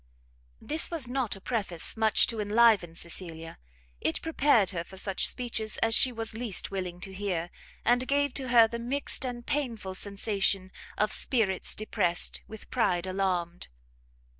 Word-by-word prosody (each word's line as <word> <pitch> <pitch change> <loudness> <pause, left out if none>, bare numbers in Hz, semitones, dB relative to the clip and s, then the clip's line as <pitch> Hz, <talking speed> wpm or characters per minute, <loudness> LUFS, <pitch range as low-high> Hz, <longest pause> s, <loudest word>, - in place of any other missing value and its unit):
This 310 +1 -1
was 320 -7 -1
not 250 -4 -1
a - - -11
preface 190 -6 -2
much 220 -1 +4
to 230 - -4
enliven 210 -5 +3
Cecilia; 165 -1 -2 0.4
it 160 - +1
prepared 285 - +3
her 170 -3 -3
for 190 - -13
such 195 0 0
speeches 225 -3 -1
as 225 0 +2
she 255 - +4
was 225 -2 -5
least 225 -5 0
willing 180 -2 -4
to 195 - -5
hear, 185 -4 -3 0.3
and 245 +2 +3
gave 285 -1 +1
to 265 -2 -2
her 235 -2 +6
the 235 +1 -5
mixt 270 +4 0
and 240 -1 -6
painful 230 -10 -2
sensation 195 -1 0 0.3
of 210 +1 +1
spirits 210 -7 +1
depressed, 190 -5 +1
with 220 -1 -10
ride 185 -7 +1
alarmed. 185 -2 -1
215 Hz, 155 wpm, -28 LUFS, 185-240 Hz, 0.4 s, her